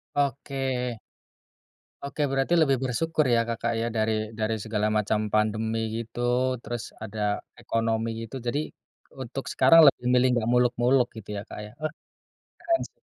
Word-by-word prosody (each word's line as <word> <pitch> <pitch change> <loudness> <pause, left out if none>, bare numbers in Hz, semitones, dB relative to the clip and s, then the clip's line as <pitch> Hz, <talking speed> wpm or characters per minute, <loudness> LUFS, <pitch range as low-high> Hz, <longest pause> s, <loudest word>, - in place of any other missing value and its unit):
Oke. 135 -4 -1 1.0
Oke 140 +2 -5
berarti 135 +5 +1
lebih 135 -4 +3
bersyukur 155 +5 0
ya 115 0 +2
Kakak 115 0 -1
ya, 115 - 0
dari 110 0 0
dari 110 +1 0
segala 105 -1 0
macam 105 0 +1
pandemi 110 +1 +1 0.2
gitu, 115 +1 -10 0.4
terus 120 0 -4 0.2
ada 110 0 -7 0.4
ekonomi 115 0 0 0.2
gitu. 115 - -10
Jadi 140 +5 0 0.6
untuk 130 +2 -5
sekarang 165 - +6
lebih 125 -3 +3
milih 125 +1 +5
nggak 115 -1 0
muluk-muluk 125 +1 +3
gitu 110 -2 -10
ya, 100 - -3
Kak, - - -7
ya? 105 - -9
Uh, 155 - -1 0.7
keren 335 0 +1
sih. - - -41
120 Hz, 145 wpm, -26 LUFS, 110-135 Hz, 1.0 s, sekarang